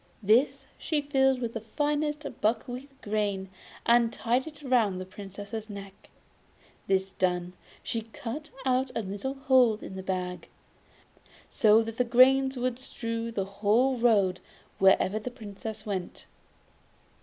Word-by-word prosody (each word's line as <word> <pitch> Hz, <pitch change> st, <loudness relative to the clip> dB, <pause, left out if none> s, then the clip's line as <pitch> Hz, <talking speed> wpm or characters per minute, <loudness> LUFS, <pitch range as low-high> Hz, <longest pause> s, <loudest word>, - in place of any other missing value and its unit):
This 225 Hz, +8 st, +3 dB
she 310 Hz, -, 0 dB
filled 270 Hz, -2 st, +2 dB
with 230 Hz, -1 st, -3 dB
the 225 Hz, -, -4 dB
finest 295 Hz, +5 st, -1 dB, 0.2 s
buckwheat 245 Hz, +5 st, -1 dB
grains, 205 Hz, -2 st, -1 dB, 0.4 s
and 235 Hz, -1 st, +4 dB
tied 245 Hz, +5 st, 0 dB
it 300 Hz, -1 st, -11 dB
round 230 Hz, -8 st, +2 dB
the 185 Hz, -, -5 dB
Princess' 205 Hz, +3 st, -8 dB
neck; 200 Hz, -1 st, -10 dB, 0.8 s
this 190 Hz, 0 st, +1 dB
done, 180 Hz, -1 st, -1 dB, 0.3 s
she 230 Hz, -, -2 dB
cut 295 Hz, +9 st, -6 dB, 0.2 s
a 255 Hz, 0 st, +3 dB, 0.2 s
little 205 Hz, +8 st, -4 dB
hole 260 Hz, -4 st, +4 dB
in 190 Hz, -, -8 dB
the 190 Hz, -, -5 dB
bag, 180 Hz, -1 st, -3 dB, 1.0 s
so 220 Hz, 0 st, +5 dB
that 225 Hz, 0 st, -7 dB
the -, -, +5 dB
grains 265 Hz, +2 st, +5 dB
would 250 Hz, 0 st, -1 dB
strew 230 Hz, -3 st, -4 dB
the 195 Hz, -4 st, -2 dB
whole 215 Hz, +7 st, +2 dB
road 210 Hz, -6 st, +3 dB, 0.4 s
wherever 195 Hz, +2 st, +4 dB
the 235 Hz, -, -5 dB
Princess 220 Hz, -2 st, -8 dB
went. 190 Hz, -4 st, -4 dB
225 Hz, 130 wpm, -28 LUFS, 200-255 Hz, 1.0 s, so